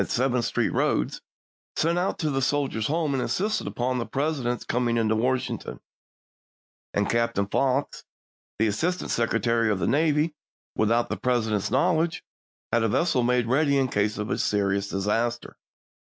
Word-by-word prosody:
Seventh 125 -1 +1
Street - - 0
roads, - - 0 0.5
sent 170 +2 +1
out 185 - -1
to 155 -3 -1
the 135 -1 0
Soldiers' 135 -5 0
Home 155 -1 0
and 135 - 0
insisted 210 +10 -1
upon 125 +1 -1
the 120 - -2
President's 135 -4 -2
coming 120 -1 0
into 110 -1 +2
Washington; 125 +3 -2 1.1
and 100 0 0
Captain 115 -3 +1
Fox, 135 +6 0 0.5
the 110 - +2
Assistant 165 - -1
Secretary 115 0 +1
of 105 - +1
the - - -1
Navy, 150 +1 +2 0.4
without 115 +2 +2
the - - -2
President's 110 -5 0
knowledge, 160 +4 +1 0.5
had 115 - +4
a 115 - +2
vessel 130 +3 +1
made 125 0 +2
ready 140 +4 +2
in 135 -1 +1
case 105 0 0
of 105 0 -3
a - - -1
serious 100 -1 0
disaster. 115 +5 -1
125 Hz, 155 wpm, -25 LUFS, 110-145 Hz, 1.1 s, had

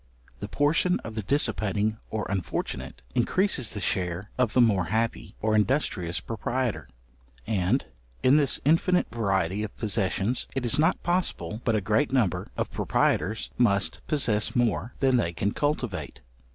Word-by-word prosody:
The - - -5
portion 160 +5 +2
of 110 - -7
the 110 - -3
dissipating 105 -3 0
or 110 -1 -3
unfortunate, 75 -8 -4
increases 130 - +1
the 105 - -5
share 90 0 -2
of 125 -4 +1
the - - +3
more 105 -7 +4
happy 110 +6 -2
or 110 0 +2
industrious 105 - +1
proprietor; 120 - -3 0.6
and 95 -4 +1 0.4
in 130 +2 +6
this 145 -3 +3
infinite 165 +4 +3
variety 95 -4 0
of 105 -1 -6
possessions, 105 +1 0
it 135 -2 -1
is 120 - +1
not 160 - +2
possible 165 - -1
but 115 - +1
a 105 - +1
great 110 +8 +1
number 120 -9 +1
of - - -2
proprietors 110 +2 0
must 100 -5 +2
possess 115 -8 +1
more 115 -3 0
than 130 -2 +4
they 85 -7 0
can 100 +4 -1
cultivate. 125 - -2
110 Hz, 150 wpm, -27 LUFS, 100-130 Hz, 0.6 s, in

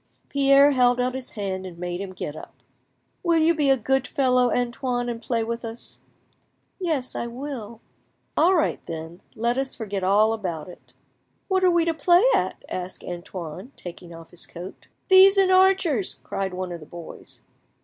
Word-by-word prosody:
Pierre 280 0 +5
held 250 -2 +3
out 250 0 0
his 260 -1 -6
hand 190 -3 -3
and 180 -2 -9
made 175 +1 -4
him 195 -1 -5
get 155 -5 -6
up. - - -11 0.7
"Will 340 -2 +2
you 325 +1 +4
be 295 -4 +1
a 270 - +5
good 265 +3 0
fellow, 255 -4 +2
Antoine, 245 0 -1
and 230 -1 -5
play 230 -2 -1
with 230 +1 -4
us?" 230 +1 -6 0.8
"Yes, 310 -9 -1
I 235 - -2
will." 235 -3 -7 0.5
"All 365 +3 +4
right, 320 - 0
then; 165 +1 -7
let 235 +3 0
us 270 -1 -2
forget 205 -4 -4
all 210 +4 +4
about 180 -8 -4
it." 180 - -14 0.6
"What 375 -1 +2
are 365 - +6
we 340 -1 +3
to 335 - +1
play 345 +5 +4
at?" - - 0
asked 185 0 -5
Antoine, 175 - -7
taking 175 0 -10
off 165 -1 -12
his 175 - -5
coat. 180 +2 -10 0.2
"Thieves 385 +1 +7
and 385 -1 +4
archers," 370 - +3
cried 190 -2 -3
one 185 -1 -4
of 170 - -6
the 155 - -13
boys.... 170 -1 -10
240 Hz, 180 wpm, -24 LUFS, 185-280 Hz, 0.8 s, Thieves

